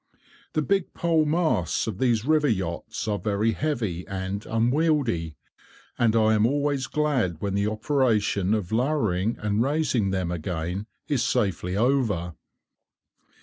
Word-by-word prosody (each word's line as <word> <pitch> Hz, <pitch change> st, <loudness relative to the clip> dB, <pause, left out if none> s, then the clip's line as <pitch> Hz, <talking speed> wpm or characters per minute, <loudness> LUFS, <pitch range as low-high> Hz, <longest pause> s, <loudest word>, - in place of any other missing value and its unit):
The 155 Hz, -, +1 dB
big 195 Hz, +2 st, 0 dB
pole 165 Hz, -2 st, +2 dB
masts 150 Hz, -, +1 dB
of 110 Hz, -3 st, -5 dB
these 120 Hz, -3 st, +1 dB
river 155 Hz, 0 st, +3 dB
yachts 95 Hz, -7 st, -2 dB
are 105 Hz, -1 st, 0 dB
very 105 Hz, +1 st, +1 dB
heavy 110 Hz, -, -2 dB
and 95 Hz, +1 st, -4 dB
unwieldy, 120 Hz, -, +1 dB, 0.6 s
and 115 Hz, -2 st, +2 dB
I 110 Hz, -1 st, +4 dB
am 110 Hz, +1 st, +3 dB
always 140 Hz, 0 st, 0 dB
glad 135 Hz, -, 0 dB
when 100 Hz, +1 st, -2 dB
the 100 Hz, +1 st, +1 dB
operation 110 Hz, -4 st, +1 dB
of 105 Hz, -3 st, -3 dB
lowering 115 Hz, -5 st, 0 dB
and 105 Hz, +1 st, 0 dB
raising 135 Hz, -6 st, +1 dB
them 95 Hz, -2 st, -1 dB
again 90 Hz, +4 st, -3 dB, 0.2 s
is 145 Hz, -6 st, +1 dB
safely 95 Hz, -5 st, 0 dB
over. 110 Hz, -8 st, +1 dB
110 Hz, 135 wpm, -25 LUFS, 95-140 Hz, 0.6 s, I